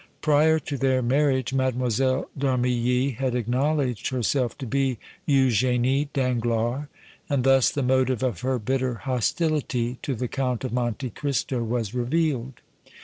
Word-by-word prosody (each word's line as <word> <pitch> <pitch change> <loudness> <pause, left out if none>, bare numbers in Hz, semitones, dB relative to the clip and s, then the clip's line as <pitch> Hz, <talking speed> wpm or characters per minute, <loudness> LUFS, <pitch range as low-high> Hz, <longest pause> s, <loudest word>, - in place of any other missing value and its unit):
Prior 155 +1 +4
to 145 -2 -4
their 130 -1 +1
marriage 130 0 +1
Mlle. 130 0 0
d' 140 - -6
Armilly 125 -1 +1
had 130 -2 -1
acknowledged 125 0 0
herself 130 -1 0
to 135 - -6
be 135 0 0 0.3
Eugénie 130 +1 +2
Danglars, 120 +1 0 0.4
and 140 -4 +1
thus 135 -1 +5
the 140 - -2
motive 130 -1 +1
of 120 -9 -1
her 130 0 0
bitter 130 +2 -1
hostility 130 0 -1
to 135 - -2
the 125 +2 -3
Count 125 -2 -2
of 130 - -3
Monte 120 +1 -2
Cristo 130 -1 -2
was 115 -2 -2
revealed. 130 -1 -1
130 Hz, 140 wpm, -25 LUFS, 120-135 Hz, 0.4 s, thus